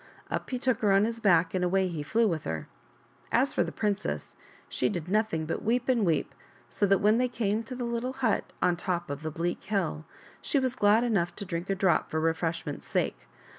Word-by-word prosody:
Up - - -3
he 255 - -1
took 255 -2 0
her 210 -4 +3
on 195 +2 +5
his 230 0 -3
back 175 -6 +3
and 185 -1 0
away 190 +1 +2
he 165 -4 -4
flew 225 +10 +2
with 165 -6 -1
her. 80 -2 -4 0.6
As 265 +4 +2
for - - +2
the - - -5
princess, 210 -1 -2 0.3
she - - 0
did 175 -5 -4
nothing 210 -5 +1
but 165 - -3
weep 245 +3 0
and 245 -4 +3
weep, 165 -4 +1 0.4
so 205 - +1
that 195 0 +5
when 215 +4 +3
they 250 - +3
came 220 -3 -1
to 255 +3 -7
the 245 -1 -3
little 235 +2 -2
hut 250 -5 0
on 180 - +3
top 175 -2 -2
of 140 +1 -5
the 155 - -3
bleak 170 +3 -3
hill, 190 -6 -1 0.4
she - - 0
was 260 -2 +1
glad 210 +3 +4
enough 200 -8 0
to 200 - -6
drink 175 0 -4
a 195 - +2
drop 190 -2 +2
for 160 - -1
refreshment's 165 +1 -2
sake. - - -1
200 Hz, 220 wpm, -28 LUFS, 170-230 Hz, 0.6 s, on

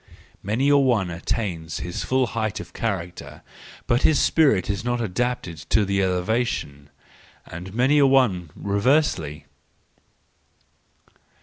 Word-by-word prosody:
—Many 110 +8 0
a 145 - +6
one 120 -10 +2
attains 85 -2 -3
his 90 0 -4
full 130 0 +1
height 110 -2 -2
of - - -10
character, 90 -6 -5 0.4
but 120 -1 +1
his 155 -3 +4
spirit 140 - +3
is 100 0 -2
not 120 0 -1
adapted 115 -4 -2
to 110 -2 +3
the 100 0 0
elevation,—and 90 - -4
many 135 +5 +3
a 140 - +6
one 115 - +2
reversely. 100 - 0
105 Hz, 115 wpm, -23 LUFS, 90-125 Hz, 0.4 s, a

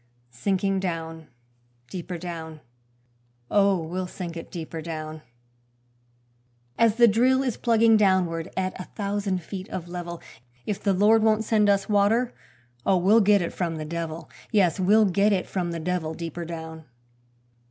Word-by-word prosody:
Sinking 195 - 0
down, 165 -3 -4 0.6
deeper 180 -1 -5
down, 165 -2 -7 0.9
Oh, 200 -2 +4
we'll 180 +3 -4
sink 175 -2 -7
it 165 - -8
deeper 165 -2 -6
down: 155 -1 -6 1.5
As 230 -2 +3
the 235 0 +6
drill 255 +5 +3
is 250 -4 -1
plugging 230 -1 +4
downward 185 -5 +1
at 185 0 -1
a - - -7
thousand 200 -3 -2
feet 190 +2 -7
of 175 -2 -5
level, 175 -1 -6 0.5
If 205 - -3
the 200 - +2
Lord 210 +4 +4
won't 220 0 +3
send 210 -2 +2
us 200 -1 +2
water, 215 +4 +2 0.5
oh, 190 - +3
we'll 200 +6 +5
get 205 -2 +4
it 170 - -4
from 170 -3 -2
the 155 -1 -5
devil; 165 0 -5 0.2
Yes, 195 -5 +3
we'll 210 +4 +5
get 200 +2 +2
it 190 -2 +1
from 180 -3 -3
the 170 -1 -4
devil 160 -1 -2
deeper 170 0 -5
down. 160 -1 -8
185 Hz, 150 wpm, -25 LUFS, 165-205 Hz, 1.5 s, the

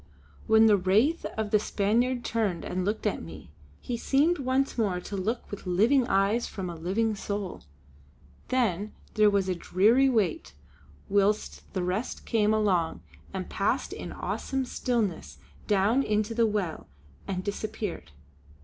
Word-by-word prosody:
When 220 0 +6
the 210 -2 +6
wraith 215 - +2
of 215 -2 -2
the 210 - +5
Spaniard 235 +5 0
turned 210 -7 -1
and 185 0 -2
looked 210 +4 -2
at 210 - 0
me, 80 -1 -10 0.3
he 245 - -3
seemed 295 +8 +2
once 270 +1 0
more 200 -6 0
to 200 - -6
look 215 +5 -3
with 205 -2 -7
living 235 +8 +3
eyes 200 +3 +2
from 185 -3 -5
a - - -7
living 195 +7 0
soul. 200 -2 -4 0.9
Then 215 -5 0 0.2
there 215 -1 +5
was 200 -2 +1
a 185 - +1
dreary 215 +10 +3
wait 170 - 0 0.5
whilst 205 +1 0
the 185 - 0
rest 185 +7 -3
came 215 -2 +2
along 190 -7 +1 0.3
and 190 -1 -4
passed 210 +6 -1
in - - -6
awesome 265 -1 -3
stillness 205 - -2 0.3
down 205 +6 +3
into 215 -2 0
the 230 0 +3
well 200 -6 -3 0.4
and 185 -1 -3
disappeared. 205 - -4
210 Hz, 150 wpm, -28 LUFS, 185-230 Hz, 0.9 s, When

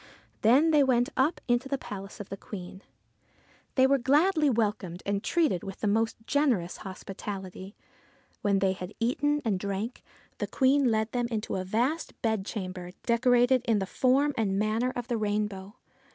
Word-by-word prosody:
Then 270 +9 +5
they 300 -2 +5
went 245 -2 +2
up 290 +6 +2
into 240 +2 +1
the 275 - 0
palace 195 -5 -8
of 205 - -8
the 195 - -4
Queen. 190 -1 -9 0.9
They 260 - +5
were 275 +1 +3
gladly 300 +5 +3
welcomed 210 -7 -1
and 200 +1 -1
treated 315 - +1
with 195 -2 -7
the 215 - 0
most 225 +2 +1
generous 245 - +1
hospitality. 190 0 -7 0.7
When 200 -1 +2
they 190 -1 +2
had 185 +1 -8
eaten 290 +5 +1
and 200 -5 +1
drank, 200 +5 -4 0.4
the - - -1
Queen 270 0 +3
led 220 0 0
them 245 -1 0
into 220 -3 -3
a 185 - -2
vast 245 - -1
bedchamber 190 -5 -3
decorated 245 +1 +3
in 230 -3 +3
the 195 - -1
form 270 +8 +2
and 200 -4 +1
manner 220 +4 +1
of 245 -1 -4
the 240 -3 -1
rainbow. 210 -1 -2
225 Hz, 165 wpm, -28 LUFS, 195-260 Hz, 0.9 s, Then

